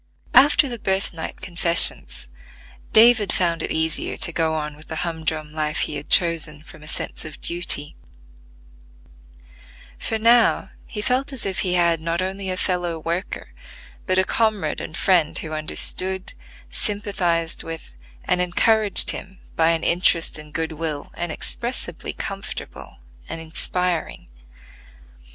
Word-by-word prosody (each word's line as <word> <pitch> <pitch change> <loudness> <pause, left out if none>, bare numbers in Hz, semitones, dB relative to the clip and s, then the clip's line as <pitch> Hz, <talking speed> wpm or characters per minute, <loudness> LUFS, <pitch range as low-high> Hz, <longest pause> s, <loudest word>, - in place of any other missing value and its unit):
After 280 +3 +6
the 240 -3 -6
birthnight 190 -4 -3
confessions, 170 -2 +3 0.6
David 220 -3 +6
found 170 -3 0
it - - -3
easier 160 0 -1
to - - +1
go 160 -1 0
on 150 -1 -4
with 155 +1 -15
the 160 - -5
humdrum 160 -2 -4
life 155 -1 -1
he - - -2
had 145 0 -7
chosen 165 -3 +2
from 155 - -14
a 150 - -9
sense - - -4
of 155 -1 -9
duty; 170 -4 -2 2.0
for 225 - -1
now 230 +1 +3 0.2
he 210 -2 -5
felt 265 +4 +1
as 265 -4 -2
if 190 -1 -2
he 180 -2 0
had 170 -2 +2
not 165 +1 -2
only 190 +1 -3
a 185 - -2
fellow 175 -3 -1
worker, 170 +4 -4 0.5
but 185 -1 +1
a 190 - +4
comrade 210 -6 0
and 155 - -7
friend 175 -5 +2
who 155 -1 -5
understood, 185 +4 +1 0.4
sympathized 190 -6 -1
with, 165 - -8 0.3
and 180 - +1
encouraged 205 +3 +5
him 190 0 -9 0.2
by 160 0 +3
an 165 -1 0
interest 170 -2 +3
and 150 0 -11
good 160 +1 -3
will 155 -2 -5
inexpressibly 205 +8 -4
comfortable 195 -1 -7 0.3
and - - -5
inspiring. 170 - -2
170 Hz, 135 wpm, -22 LUFS, 160-195 Hz, 2.0 s, After